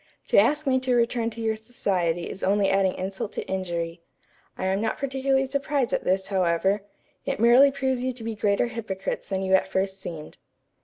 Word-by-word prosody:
To -, -, +3 dB
ask 300 Hz, +1 st, +2 dB
me 260 Hz, -1 st, +3 dB
to 255 Hz, -1 st, +1 dB
return 235 Hz, -1 st, +1 dB
to 230 Hz, 0 st, -8 dB
your 220 Hz, -1 st, 0 dB
society 185 Hz, -7 st, -1 dB
is 195 Hz, -, -8 dB
only 200 Hz, +1 st, +2 dB
adding 195 Hz, -1 st, +2 dB
insult 190 Hz, +2 st, -4 dB
to -, -, -5 dB
injury. 170 Hz, -3 st, -3 dB, 0.6 s
I -, -, -3 dB
am 190 Hz, +2 st, +1 dB
not 225 Hz, -, -1 dB
particularly 270 Hz, 0 st, 0 dB
surprised 275 Hz, -2 st, -1 dB
at -, -, -1 dB
this, 190 Hz, +1 st, +1 dB
however. 190 Hz, +1 st, +1 dB, 0.5 s
It -, -, -1 dB
merely 240 Hz, +5 st, +7 dB
proves 265 Hz, -2 st, -1 dB
you 255 Hz, -, 0 dB
to 240 Hz, -2 st, -9 dB
be 225 Hz, 0 st, -3 dB
greater 205 Hz, +1 st, +1 dB
hypocrites 215 Hz, -6 st, -4 dB
than 190 Hz, -1 st, -1 dB
you 190 Hz, 0 st, 0 dB
at 190 Hz, -, +4 dB
first 190 Hz, 0 st, -2 dB
seemed. 160 Hz, -4 st, -8 dB
205 Hz, 195 wpm, -25 LUFS, 190-250 Hz, 0.6 s, merely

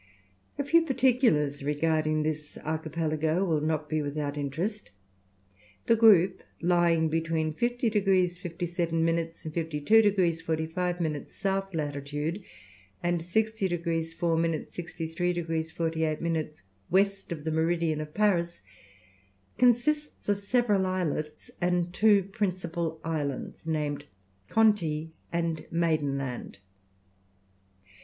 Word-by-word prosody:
A 285 Hz, -, 0 dB
few 335 Hz, +4 st, +5 dB
particulars 245 Hz, -, +2 dB
regarding 155 Hz, +1 st, +1 dB
this 150 Hz, -1 st, -4 dB
archipelago 160 Hz, +2 st, 0 dB
will 160 Hz, -5 st, +1 dB
not 155 Hz, 0 st, -1 dB
be 155 Hz, +1 st, 0 dB
without 145 Hz, 0 st, -3 dB
interest. 165 Hz, +10 st, -3 dB, 1.0 s
The 230 Hz, -, +5 dB
group, 210 Hz, -5 st, +5 dB, 0.2 s
lying 170 Hz, -2 st, +3 dB
between 160 Hz, 0 st, 0 dB
50 240 Hz, +5 st, 0 dB
degrees 190 Hz, -4 st, +2 dB
57 170 Hz, -1 st, -1 dB
minutes, 165 Hz, 0 st, -1 dB
and 155 Hz, -, -5 dB
52 165 Hz, +6 st, +3 dB
degrees 185 Hz, -6 st, +2 dB
45 165 Hz, +2 st, -2 dB
minutes 155 Hz, +4 st, -4 dB
S. 195 Hz, 0 st, 0 dB
latitude, 145 Hz, +4 st, -3 dB, 0.6 s
and 175 Hz, -1 st, +1 dB
60 220 Hz, +3 st, 0 dB
degrees 165 Hz, -2 st, -2 dB
4 170 Hz, -1 st, +1 dB
minutes, 165 Hz, -1 st, -1 dB
63 175 Hz, 0 st, -3 dB
degrees 165 Hz, -2 st, -2 dB
48 160 Hz, -1 st, -1 dB
minutes 160 Hz, -, -3 dB, 0.3 s
west 195 Hz, +1 st, +1 dB
of 155 Hz, -3 st, -4 dB
the 160 Hz, -, -2 dB
meridian 160 Hz, -1 st, +1 dB
of 150 Hz, 0 st, -8 dB
Paris, 175 Hz, -5 st, +1 dB, 1.0 s
consists 255 Hz, +5 st, +2 dB
of 205 Hz, -1 st, +1 dB
several 205 Hz, -2 st, +2 dB
islets 155 Hz, -5 st, -3 dB
and 175 Hz, 0 st, +1 dB
two 205 Hz, -1 st, +5 dB
principal 175 Hz, -5 st, -3 dB
islands, 155 Hz, -1 st, -4 dB
named 150 Hz, -2 st, -2 dB, 0.4 s
Conti 165 Hz, -8 st, +2 dB, 0.2 s
and 170 Hz, -2 st, -1 dB
Maidenland. 140 Hz, -9 st, -1 dB
165 Hz, 115 wpm, -28 LUFS, 155-190 Hz, 1.0 s, few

